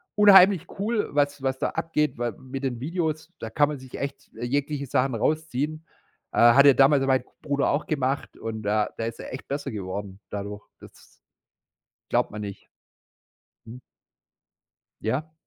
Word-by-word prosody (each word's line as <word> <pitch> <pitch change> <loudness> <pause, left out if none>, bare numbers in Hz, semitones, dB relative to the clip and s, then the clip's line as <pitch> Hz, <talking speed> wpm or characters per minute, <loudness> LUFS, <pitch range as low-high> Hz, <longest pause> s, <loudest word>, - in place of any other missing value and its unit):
unheimlich 195 -3 +7
cool, 215 +2 0
was 145 -1 +1
was 130 0 -1
da - - 0
abgeht, 160 -3 -1
weil 120 -1 -1
mit 130 +3 -8
den 125 -3 -2
Videos, 160 +2 -3
da 115 - -5
kann 145 +3 +3
man 150 - -4
sich 130 -1 -10
echt 140 0 -6
jegliche 140 +4 -2
Sachen 125 +2 +1
rausziehen. 155 +3 -1 0.5
Äh, - - 0
hat 140 +1 +7
ja 140 - +9
damals 135 +1 +5
mein 130 -1 +2 0.2
Bruder 140 -1 +1
auch 145 +2 -1
gemacht 140 -2 -1
und 110 -1 -5
da 105 +1 +1
da 115 - -2
ist 115 0 -5
er - - -8
echt 130 - -8
besser 140 +1 -3
geworden 100 -1 -6
dadurch. 105 0 -5 0.2
Das - - -16 1.1
glaubt - - +1
man 105 - -6
nicht. 100 -2 -8 1.0
Mhm. 120 +3 -10 1.2
Ja. 145 +8 -2
135 Hz, 160 wpm, -25 LUFS, 115-150 Hz, 1.2 s, ja